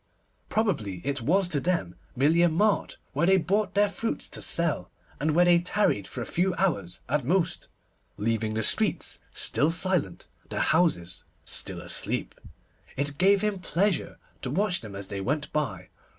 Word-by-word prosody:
Probably 145 - 0
it 140 -2 -1
was 180 +9 +2
to 150 - +1
them 165 - -1 0.2
merely 150 +6 +3
a 175 - +5
mart 205 +6 +1 0.2
where 150 +5 +1
they 190 0 +6
brought 200 +4 0
their 205 +1 +5
fruits 225 +3 -3
to - - -4
sell, 170 -2 0 0.3
and 150 +1 +1
where 175 +1 +6
they 175 -1 +6
tarried 175 - +1
for 125 - -5
a - - -6
few 180 +1 0
hours 140 - -1
at 145 +2 0
most, 170 +6 0 0.5
leaving 110 0 -1
the 110 - 0
streets - - +2
still 150 - +1
silent, 170 - -1 0.2
the - - -3
houses 90 - +1 0.2
still - - -2
asleep. - - -1 0.6
It 145 +1 -2
gave 195 +1 +5
him 210 -2 -1
pleasure 185 +1 0 0.2
to 130 - -4
watch 180 +6 +1
them 105 -4 -9
as 100 -1 -6
they 100 -2 -4
went 145 +9 -2
by. 105 -12 -2
160 Hz, 165 wpm, -27 LUFS, 120-185 Hz, 0.6 s, they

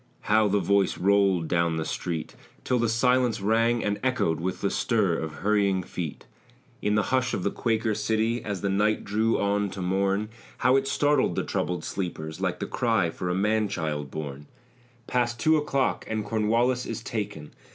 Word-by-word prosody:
How 110 0 +3
the 100 0 +2
voice 100 0 +2
rolled 95 -3 +3
down 85 -1 +1
the 80 - -2
street 85 -3 -4 0.3
Till 125 -1 +1
the 115 -1 +1
silence 125 0 +2
rang 115 +3 +2
and 105 0 -1
echoed 125 -11 +1
With 90 +2 -3
the 100 - 0
stir 105 -8 +1
of 80 -1 -3
hurrying 100 -3 +2
feet! 85 -4 -6 0.6
In 105 0 +1
the 105 +3 0
hush 130 -1 +2
of 90 - -3
the 100 - 0
Quaker 110 -1 0
city, 110 +2 0
As 100 -3 -4
the 100 - 0
night 105 +2 +1
drew 110 +3 +1
on 100 0 +1
to 95 - -8
morn, 100 +3 0 0.3
How 130 +1 +3
it 135 0 +2
startled 145 +1 +2
the - - 0
troubled 90 0 -2
sleepers, 80 -4 -5
Like - - 0
the - - -2
cry - - +1
for 90 - -4
a 90 - 0
man 105 +2 +1
child 75 -7 -3
born! 75 -1 -6 0.6
"Past 120 -2 0
two 155 +7 +4
o'clock 145 -3 0
and 110 -1 -2
Cornwallis 115 +3 +1
is 115 0 -5
taken." 100 -11 -5
105 Hz, 185 wpm, -26 LUFS, 95-115 Hz, 0.6 s, two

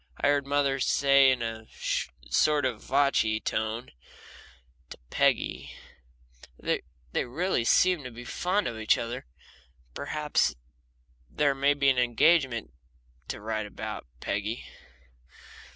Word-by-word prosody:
And - - -2
I - - +5
heard 140 -1 +1
mother 140 -1 +1
say 140 +1 +5
in 130 -2 +1
a 110 -1 -5 0.6
"sort 150 -2 +3
of 120 -4 -2
vochy" 135 -6 +2
tone 110 +3 -3 1.0
to - - -9
Peggy: - - 0 0.8
"They - - -1 0.3
really 145 +2 0
seem 180 +6 +3
to - - -4
be 120 0 -10
fond 185 +10 0
of 115 -2 -4
each 110 - +3
other. 120 - -5 0.7
Perhaps 150 - 0 0.7
there 145 - +2
may 140 +1 +2
be 140 -1 +3
an 130 -2 +3
engagement 125 - +2 0.6
to - - -5
write 110 +1 -2
you - - -7
about, 95 - -7
Peggy." 105 +4 -3
130 Hz, 125 wpm, -28 LUFS, 115-145 Hz, 1.0 s, I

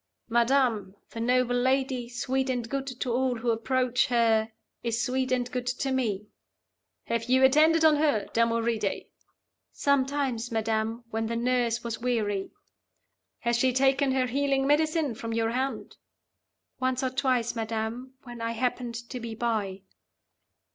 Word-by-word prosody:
'Madam, 235 -4 +2 0.2
the 230 - -7
noble 245 +1 +2
lady, 260 -1 0
sweet 260 +2 -1
and 245 -3 -1
good 275 0 -2
to 255 -2 -3
all 255 0 +1
who 235 +1 0
approach 250 +2 +1
her, 225 -2 +2 0.3
is 230 -1 -1
sweet 260 0 -1
and 245 -1 0
good 250 -1 -3
to 255 +2 -1
me.' 215 -6 -1 0.8
'Have 230 -1 -2
you 260 +2 +3
attended 315 +4 +5
on 310 -1 +6
her, 290 -9 +2
Damoride?' 230 -2 0 0.7
'Sometimes, 270 -4 0
madam, 225 +1 -1
when 225 0 -1
the 230 - -2
nurse 240 -1 0
was 230 -1 -4
weary.' 210 -5 -1 0.9
'Has 235 0 +1
she 255 +1 +3
taken 270 +2 +2
her 260 -1 +2
healing 270 +1 +1
medicine 305 -1 +2
from 230 0 -5
your 225 0 0
hand.' 260 +3 -3 0.8
'Once 260 0 0
or 260 - 0
twice, 255 -3 0
madam, 225 +3 -4
when 240 -2 -9
I 230 0 -2
happened 245 0 -2
to 250 - -6
be 230 -1 -6
by. 210 -5 -2
245 Hz, 145 wpm, -27 LUFS, 230-265 Hz, 0.9 s, on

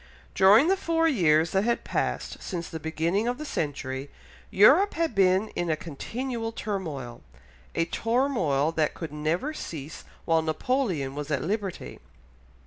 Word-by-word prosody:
During 205 +9 +6
the 385 - +4
four 330 -3 +1
years 165 - +3
that 195 +1 +2
had 235 +1 0
passed - - -3
since 170 -2 -4
the 160 - -6
beginning 165 +7 -1
of 245 +1 -1
the 305 - -6
century, 140 - -3 0.4
Europe 300 - +5
had 330 -5 0
been 190 +1 +3
in 175 -1 -3
a 155 - +2
continual 225 - -4
turmoil, 160 - -5 0.5
a 165 - +2
turmoil 225 - +1
that 155 -2 0
could 160 -4 -6
never 160 - -1
cease 155 - -7 0.2
while 165 -1 +3
Napoleon 160 - -1
was 145 +1 -5
at 145 - -1
liberty. 190 - -4
180 Hz, 145 wpm, -27 LUFS, 155-235 Hz, 0.5 s, During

